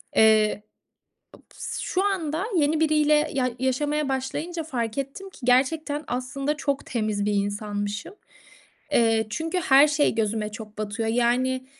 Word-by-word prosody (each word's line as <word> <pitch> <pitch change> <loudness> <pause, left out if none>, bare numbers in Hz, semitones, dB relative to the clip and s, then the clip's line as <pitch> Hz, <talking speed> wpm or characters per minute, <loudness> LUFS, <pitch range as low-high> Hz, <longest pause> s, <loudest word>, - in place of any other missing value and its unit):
Eee, 215 -1 +4 0.7
ob - - -17
s - - -5
şu 375 +2 0
anda 355 -3 -1
yeni 305 0 +2
biriyle 305 -1 +3
ya 255 -2 +1
yaşamaya 290 +3 0
başlayınca 300 +6 -3
fark 235 -5 -3
ettim 275 +9 -5
ki - - -16
gerçekten, 290 +4 +2
aslında, 270 +4 -2
çok 280 -2 -2
temiz 215 -3 -1
bir 210 - +1
insanmışım. 205 - -3 0.8
Eee, 225 -2 +3
çünkü 325 - -2
her 285 -2 +6
şey 295 0 +2
gözüme 215 -1 -1
çok 215 0 -10
batıyor. 215 +1 -2
Yani, 255 +2 +1
260 Hz, 135 wpm, -25 LUFS, 220-300 Hz, 0.8 s, her